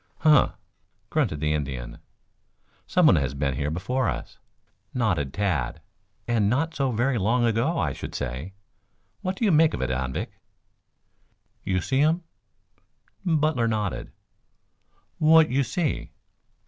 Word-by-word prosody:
"Huh!" 150 Hz, -4 st, +5 dB, 0.6 s
grunted 75 Hz, -1 st, 0 dB
the 75 Hz, 0 st, +1 dB
Indian. 65 Hz, -5 st, -4 dB, 0.9 s
"Someone 165 Hz, -, +5 dB
has 70 Hz, -1 st, -1 dB
been 70 Hz, -1 st, 0 dB
here 70 Hz, +3 st, -2 dB
before 110 Hz, +11 st, -1 dB
us," -, -, -6 dB, 0.6 s
nodded 90 Hz, -, 0 dB
Tad. 100 Hz, -5 st, -1 dB, 0.5 s
"And 110 Hz, -4 st, +2 dB
not 150 Hz, +7 st, 0 dB
so 135 Hz, -3 st, 0 dB
very 120 Hz, +2 st, +1 dB
long 120 Hz, +5 st, +2 dB
ago, 120 Hz, +9 st, +1 dB
I -, -, 0 dB
should -, -, -7 dB
say. 65 Hz, +10 st, -5 dB, 0.7 s
What 185 Hz, +1 st, -2 dB
do 225 Hz, -, -1 dB
you 205 Hz, -, +4 dB
make 160 Hz, 0 st, +4 dB
of -, -, -5 dB
it, 65 Hz, -, -1 dB
Anvik?" 65 Hz, 0 st, -3 dB, 1.3 s
"You 95 Hz, -1 st, 0 dB
see 130 Hz, +8 st, +1 dB
um?" 165 Hz, +3 st, +2 dB, 1.0 s
Butler 155 Hz, -8 st, +2 dB
nodded. 105 Hz, -, -2 dB, 1.1 s
"What 160 Hz, 0 st, +6 dB
you 135 Hz, +2 st, +2 dB
see?" 155 Hz, +3 st, -2 dB
115 Hz, 130 wpm, -25 LUFS, -, 1.3 s, What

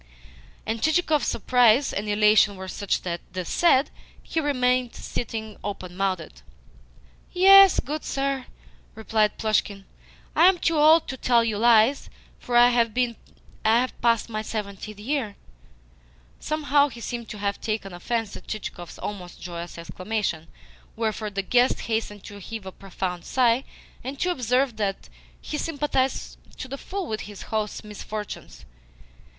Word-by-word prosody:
And 225 Hz, 0 st, -3 dB
Chichikov's 315 Hz, 0 st, +2 dB
surprise 245 Hz, +3 st, +3 dB
and 210 Hz, +1 st, -3 dB
elation 210 Hz, 0 st, +4 dB
were 190 Hz, 0 st, -8 dB
such 200 Hz, +1 st, -2 dB
that, 170 Hz, -1 st, -3 dB
this 185 Hz, -2 st, -4 dB
said, 300 Hz, -5 st, +3 dB, 0.3 s
he 325 Hz, -, -2 dB
remained 255 Hz, -4 st, +1 dB
sitting 220 Hz, -2 st, -5 dB
open 185 Hz, -3 st, -6 dB
mouthed. 185 Hz, -, -2 dB, 0.9 s
"Yes, 390 Hz, +1 st, +8 dB
good 300 Hz, +3 st, -4 dB
sir," 275 Hz, -1 st, -2 dB, 0.5 s
replied 215 Hz, -1 st, +1 dB
Plushkin. 205 Hz, -2 st, 0 dB, 0.5 s
"I 345 Hz, -, +7 dB
am 380 Hz, -, +1 dB
too 330 Hz, -2 st, +1 dB
old 315 Hz, +2 st, +6 dB
to 265 Hz, -, -5 dB
tell 240 Hz, -2 st, +3 dB
you 220 Hz, -3 st, -1 dB
lies, 235 Hz, +3 st, +4 dB, 0.3 s
for 240 Hz, -1 st, 0 dB
I 240 Hz, 0 st, +8 dB
have 235 Hz, 0 st, -1 dB
passed 230 Hz, -1 st, +2 dB
my 215 Hz, -2 st, -3 dB
seventieth 210 Hz, -1 st, -6 dB
year." 230 Hz, -3 st, -2 dB, 1.0 s
Somehow 290 Hz, -2 st, +2 dB
he 240 Hz, -4 st, -10 dB
seemed 235 Hz, -1 st, -5 dB
to 210 Hz, -, -7 dB
have 200 Hz, 0 st, -2 dB
taken 215 Hz, -4 st, -3 dB
offence 225 Hz, +4 st, -3 dB
at -, -, -12 dB
Chichikov's 175 Hz, -5 st, -6 dB
almost 180 Hz, -4 st, -7 dB
joyous 170 Hz, -1 st, -7 dB
exclamation; 170 Hz, 0 st, -3 dB, 0.5 s
wherefore 220 Hz, -1 st, -2 dB
the 200 Hz, -1 st, -3 dB
guest 245 Hz, +5 st, +2 dB
hastened 220 Hz, -3 st, -3 dB
to 205 Hz, 0 st, -10 dB
heave 220 Hz, +1 st, -7 dB
a 190 Hz, -, -6 dB
profound 180 Hz, -2 st, -5 dB
sigh, 250 Hz, 0 st, +2 dB, 0.4 s
and 270 Hz, +2 st, -6 dB
to 360 Hz, -, +2 dB
observe 250 Hz, -4 st, 0 dB
that 200 Hz, -2 st, -3 dB, 0.3 s
he 300 Hz, -, -5 dB
sympathised 285 Hz, -4 st, -1 dB, 0.2 s
to -, -, -6 dB
the 275 Hz, +1 st, -6 dB
full 390 Hz, 0 st, -4 dB
with 215 Hz, -7 st, -4 dB
his 205 Hz, -1 st, -9 dB
host's 215 Hz, 0 st, -2 dB
misfortunes. 210 Hz, 0 st, -7 dB
225 Hz, 140 wpm, -25 LUFS, 205-260 Hz, 1.0 s, Yes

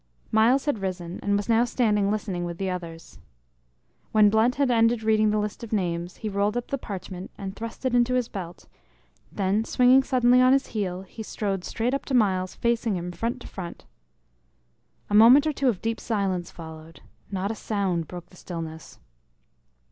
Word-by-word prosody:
Myles 235 Hz, +5 st, +4 dB
had 290 Hz, -7 st, 0 dB
risen, 180 Hz, -2 st, -4 dB
and 205 Hz, 0 st, +1 dB
was 205 Hz, -, -3 dB
now 230 Hz, 0 st, +4 dB
standing 215 Hz, -5 st, +1 dB
listening 200 Hz, -4 st, -2 dB
with 170 Hz, -1 st, -5 dB
the 190 Hz, 0 st, -2 dB
others. 170 Hz, -2 st, -8 dB, 0.9 s
When 210 Hz, -1 st, +5 dB
Blunt 220 Hz, +3 st, +3 dB
had 275 Hz, -2 st, +2 dB
ended 230 Hz, -1 st, +3 dB
reading 215 Hz, -1 st, +3 dB
the 210 Hz, -, +1 dB
list 210 Hz, +2 st, -3 dB
of 230 Hz, -, -8 dB
names, 175 Hz, -4 st, -2 dB
he 220 Hz, -, -5 dB
rolled 205 Hz, +2 st, 0 dB
up 245 Hz, -, -4 dB
the 275 Hz, -, -2 dB
parchment, 190 Hz, -3 st, -7 dB
and 195 Hz, -1 st, -6 dB
thrust 230 Hz, +3 st, -7 dB
it 255 Hz, -, +1 dB
into 245 Hz, +1 st, +3 dB
his 250 Hz, -2 st, +1 dB
belt; 175 Hz, -6 st, -8 dB, 0.6 s
then 200 Hz, +2 st, 0 dB
swinging 250 Hz, +3 st, +5 dB
suddenly 250 Hz, -1 st, +4 dB
on 255 Hz, +1 st, +6 dB
his 275 Hz, 0 st, +2 dB
heel, 190 Hz, -4 st, -2 dB
he 205 Hz, +4 st, -10 dB
strode 200 Hz, -3 st, -3 dB
straight 235 Hz, +6 st, -2 dB
up 275 Hz, -, -2 dB
to 265 Hz, -, -1 dB
Myles, 185 Hz, -5 st, +1 dB
facing 235 Hz, -3 st, 0 dB
him 175 Hz, 0 st, -4 dB
front 235 Hz, +7 st, -3 dB
to -, -, -9 dB
front. 175 Hz, -3 st, -8 dB, 1.2 s
A -, -, -6 dB
moment 240 Hz, +7 st, +8 dB
or 310 Hz, -, 0 dB
two 275 Hz, -2 st, +1 dB
of 205 Hz, -7 st, -3 dB
deep 225 Hz, 0 st, -1 dB
silence 195 Hz, -5 st, -1 dB
followed; 160 Hz, -1 st, -11 dB, 0.3 s
not 195 Hz, +1 st, -2 dB
a -, -, -2 dB
sound 190 Hz, -7 st, -2 dB
broke 175 Hz, -1 st, -9 dB
the 180 Hz, -, -17 dB
stillness. 165 Hz, -3 st, -7 dB
210 Hz, 185 wpm, -25 LUFS, 185-235 Hz, 1.2 s, moment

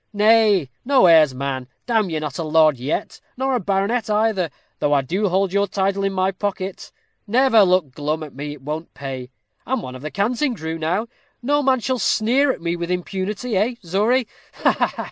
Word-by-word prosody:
Nay, 210 Hz, -, +4 dB
no 265 Hz, -6 st, +4 dB
airs, 155 Hz, -6 st, +6 dB
man; 130 Hz, -1 st, -3 dB, 0.2 s
damme 220 Hz, -5 st, +1 dB
you're 160 Hz, -2 st, -2 dB
not 150 Hz, -1 st, -5 dB
a -, -, -1 dB
lord 155 Hz, -2 st, +4 dB
yet, 135 Hz, +5 st, -3 dB, 0.2 s
nor 265 Hz, +1 st, 0 dB
a 250 Hz, -, +1 dB
baronet 200 Hz, +4 st, -1 dB
either, 210 Hz, -5 st, +1 dB, 0.3 s
though 145 Hz, -, +1 dB
I 140 Hz, -, +4 dB
do 190 Hz, +9 st, -1 dB
hold 190 Hz, +1 st, +1 dB
your 200 Hz, 0 st, +2 dB
title 195 Hz, +1 st, -1 dB
in 195 Hz, -, +1 dB
my 190 Hz, 0 st, +1 dB
pocket; 190 Hz, -1 st, -4 dB, 0.4 s
never 240 Hz, 0 st, +4 dB
look 180 Hz, -7 st, +3 dB
glum 150 Hz, +3 st, -3 dB
at 150 Hz, -, -10 dB
me. 145 Hz, +2 st, -6 dB
It 145 Hz, -3 st, -14 dB
won't 155 Hz, +3 st, -6 dB
pay. 130 Hz, -3 st, -6 dB, 0.3 s
I'm 260 Hz, -1 st, -2 dB
one 125 Hz, -, -7 dB
of 130 Hz, -, -9 dB
the 155 Hz, -, -5 dB
Canting 240 Hz, -, 0 dB
Crew 160 Hz, -3 st, -5 dB
now; 175 Hz, +8 st, 0 dB, 0.4 s
no 290 Hz, +3 st, +2 dB
man 260 Hz, -3 st, +2 dB
shall 255 Hz, +2 st, -1 dB
sneer 255 Hz, +7 st, +2 dB
at -, -, -7 dB
me 170 Hz, 0 st, -1 dB
with 170 Hz, 0 st, -4 dB
impunity, 195 Hz, +5 st, -3 dB
eh, 220 Hz, +6 st, +1 dB
Zory? 215 Hz, +9 st, +2 dB, 0.4 s
Ha, -, -, +6 dB
ha! -, -, -1 dB
190 Hz, 200 wpm, -21 LUFS, 155-225 Hz, 0.4 s, airs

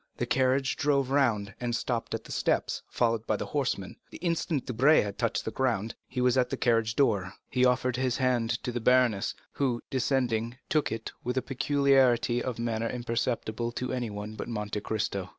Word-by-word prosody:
The -, -, -1 dB
carriage 130 Hz, +1 st, +1 dB
drove 140 Hz, -2 st, +1 dB
round, 110 Hz, -8 st, +2 dB
and 120 Hz, -1 st, -1 dB
stopped 120 Hz, -1 st, -2 dB
at -, -, -6 dB
the -, -, -11 dB
steps, -, -, 0 dB
followed 115 Hz, -2 st, 0 dB
by -, -, +2 dB
the -, -, -3 dB
horsemen. 125 Hz, -10 st, -2 dB
The -, -, -9 dB
instant 165 Hz, -4 st, -1 dB
Debray 135 Hz, +6 st, +4 dB
had 100 Hz, -1 st, -5 dB
touched -, -, 0 dB
the -, -, -2 dB
ground, 115 Hz, -5 st, 0 dB
he 125 Hz, -1 st, -3 dB
was 125 Hz, +1 st, +3 dB
at 125 Hz, -1 st, +2 dB
the -, -, -2 dB
carriage 115 Hz, -2 st, +2 dB
door. 100 Hz, -8 st, +1 dB, 0.2 s
He 125 Hz, 0 st, +3 dB
offered 125 Hz, 0 st, +2 dB
his 130 Hz, -2 st, 0 dB
hand 125 Hz, -3 st, +1 dB
to 125 Hz, -, -2 dB
the 120 Hz, -, -2 dB
baroness, 125 Hz, -4 st, +3 dB, 0.2 s
who, 125 Hz, -4 st, -1 dB
descending, 125 Hz, -3 st, 0 dB
took 155 Hz, -6 st, +1 dB
it 115 Hz, 0 st, -4 dB
with 125 Hz, +2 st, -2 dB
a 130 Hz, -, +1 dB
peculiarity 135 Hz, -3 st, +3 dB
of 125 Hz, -2 st, -3 dB
manner 115 Hz, -1 st, -1 dB
imperceptible 120 Hz, -1 st, -2 dB
to 125 Hz, +1 st, -3 dB
everyone 110 Hz, -4 st, -4 dB
but -, -, -6 dB
Monte 105 Hz, -3 st, -3 dB
Cristo. 100 Hz, -3 st, -2 dB
120 Hz, 185 wpm, -29 LUFS, 115-130 Hz, 0.2 s, Debray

